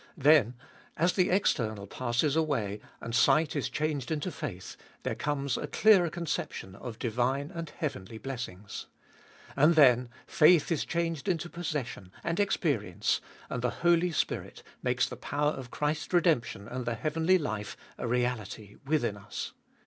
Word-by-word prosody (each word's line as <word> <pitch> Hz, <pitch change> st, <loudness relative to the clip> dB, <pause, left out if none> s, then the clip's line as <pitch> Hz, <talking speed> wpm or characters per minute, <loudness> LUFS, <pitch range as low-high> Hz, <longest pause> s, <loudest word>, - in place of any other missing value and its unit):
Then, 140 Hz, -5 st, +5 dB, 0.4 s
as 170 Hz, +3 st, +3 dB
the 185 Hz, -2 st, +2 dB
external 110 Hz, -, +1 dB
passes 125 Hz, +6 st, 0 dB
away, 115 Hz, -11 st, 0 dB, 0.2 s
and 115 Hz, -, -5 dB
sight 155 Hz, +6 st, +4 dB
is 135 Hz, -3 st, -1 dB
changed 150 Hz, -1 st, -2 dB
into 160 Hz, +3 st, -2 dB
faith, 105 Hz, -, -6 dB, 0.3 s
there -, -, -1 dB
comes 140 Hz, -3 st, -1 dB
a -, -, -3 dB
clearer 195 Hz, -6 st, +5 dB
conception 155 Hz, -, -4 dB
of 115 Hz, +3 st, -8 dB
divine 130 Hz, -, -1 dB
and 165 Hz, -2 st, -5 dB
heavenly 115 Hz, -, -5 dB
blessings. 110 Hz, -6 st, -6 dB, 0.7 s
And 150 Hz, +4 st, +5 dB
then 125 Hz, -5 st, +6 dB, 0.2 s
faith 160 Hz, +1 st, +5 dB
is 165 Hz, -, +1 dB
changed 165 Hz, -2 st, -2 dB
into 175 Hz, -2 st, -1 dB
possession 145 Hz, -, -4 dB
and 170 Hz, +2 st, -1 dB
experience, 140 Hz, -, +1 dB, 0.3 s
and 125 Hz, -, -3 dB
the 125 Hz, -, +1 dB, 0.2 s
Holy 175 Hz, +1 st, +4 dB
Spirit 155 Hz, -, -2 dB, 0.2 s
makes -, -, +1 dB
the -, -, -7 dB
power 145 Hz, +1 st, 0 dB
of 130 Hz, -5 st, -7 dB
Christ's 150 Hz, +4 st, -2 dB
redemption 155 Hz, -, +2 dB
and 125 Hz, +1 st, -4 dB
the 120 Hz, -, 0 dB
heavenly 160 Hz, +7 st, +2 dB
life 110 Hz, -, -4 dB, 0.2 s
a -, -, -2 dB
reality 115 Hz, -4 st, -2 dB
within 135 Hz, -8 st, +1 dB
us. 100 Hz, 0 st, -6 dB
140 Hz, 150 wpm, -30 LUFS, 115-160 Hz, 0.7 s, then